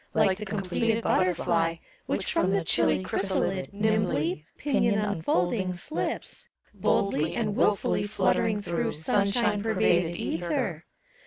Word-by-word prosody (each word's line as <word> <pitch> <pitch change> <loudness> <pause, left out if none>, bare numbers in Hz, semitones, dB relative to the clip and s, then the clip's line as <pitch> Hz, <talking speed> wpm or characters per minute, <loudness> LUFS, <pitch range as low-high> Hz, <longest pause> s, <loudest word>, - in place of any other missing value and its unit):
Like 200 -3 +3
the 210 - -5
completed 210 +3 -1
butterfly. 170 -2 +1 0.3
Which - - -1
from 330 - +2
the 195 -2 +1
chilly 175 - +2
chrysalid 190 0 -1
Nimbly, 195 -7 0
pinion 245 -7 +1
unfolding, 185 -1 0
slips, 290 - -4 0.3
Boldly 165 -5 0
and 215 -3 -1
wilfully 205 -1 +1
fluttering 205 +1 +1
through 170 -4 -2
Sunshine 200 +6 +1
pervaded 180 -5 +2
ether. 170 0 -2
195 Hz, 110 wpm, -27 LUFS, 175-210 Hz, 0.3 s, Like